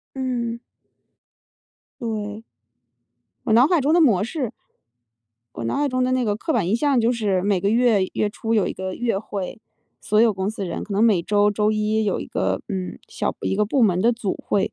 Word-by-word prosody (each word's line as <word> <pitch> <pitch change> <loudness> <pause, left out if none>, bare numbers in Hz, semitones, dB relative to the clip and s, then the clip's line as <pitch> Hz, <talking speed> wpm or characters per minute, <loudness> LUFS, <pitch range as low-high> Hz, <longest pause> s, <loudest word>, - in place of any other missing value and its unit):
嗯。 240 -3 -2 1.4
对。 215 -2 -4 1.0
我 - - 0
脑 240 +4 +6
海 340 0 +2
中 290 +4 +2
的 350 - +5
模 220 - +4
式 250 0 -3 1.0
我 115 - -5
脑 115 - -1
海 290 0 +1
中 255 -1 0
的 255 - 0
那 255 -1 +1
个 205 -1 0
刻 320 +8 -2
板 175 - +1
印 210 - +2
象 275 -1 +2
就 230 +1 +2
是 205 -6 0
每 195 -2 +1
个 200 - +1
月 230 -2 +3
月 210 - 0
初 225 +2 -2
有 210 -4 +2
一 - - -3
个 190 0 -5
月 235 -5 -1
会， 200 0 -6 0.4
所 215 +1 +2
有 230 -1 +5
公 190 0 -2
司 215 -2 -5
人 175 - -4
可 205 - -7
能 200 +2 +2
每 210 -7 +4
周 205 +2 +2
周 210 +1 +1
一 215 +1 0
有 205 - 0
一 - - -6
个， - - -1
嗯， 190 -3 -4
小 - - -2
一 - - -1
个 210 - +2
部 250 +5 +1
门 185 -5 +3
的 235 +4 +4
组 225 -5 -3
会。 200 - 0
215 Hz, 225 characters per minute, -22 LUFS, 200-240 Hz, 1.4 s, 脑